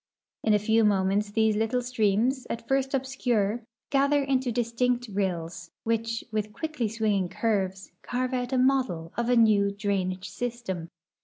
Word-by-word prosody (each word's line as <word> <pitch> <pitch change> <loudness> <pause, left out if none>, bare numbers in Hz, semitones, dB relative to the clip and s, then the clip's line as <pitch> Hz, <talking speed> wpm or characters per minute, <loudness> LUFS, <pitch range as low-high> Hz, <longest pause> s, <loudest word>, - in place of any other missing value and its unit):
In 215 -1 +4
a - - +5
few 220 +2 +3
moments 200 0 +2
these 220 0 +2
little 225 +3 0
streams, 245 +2 +1
at 230 0 -5
first 270 0 +1
obscure, 245 -5 0 0.3
gather 280 +1 +3
into 265 -2 0
distinct 245 +1 0
rills, 175 -3 -2
which, 230 0 -1
with 215 -1 -2
quickly 300 -2 -2
swinging 210 -4 0
curves, 190 -1 -1
carve 255 +1 -2
out 250 0 -1
a 260 - +1
model 255 -11 +1
of 235 0 -1
a 250 - +4
new 215 -3 +5
drainage 195 -2 -2
system. 230 -9 -4
225 Hz, 150 wpm, -27 LUFS, 200-250 Hz, 0.3 s, a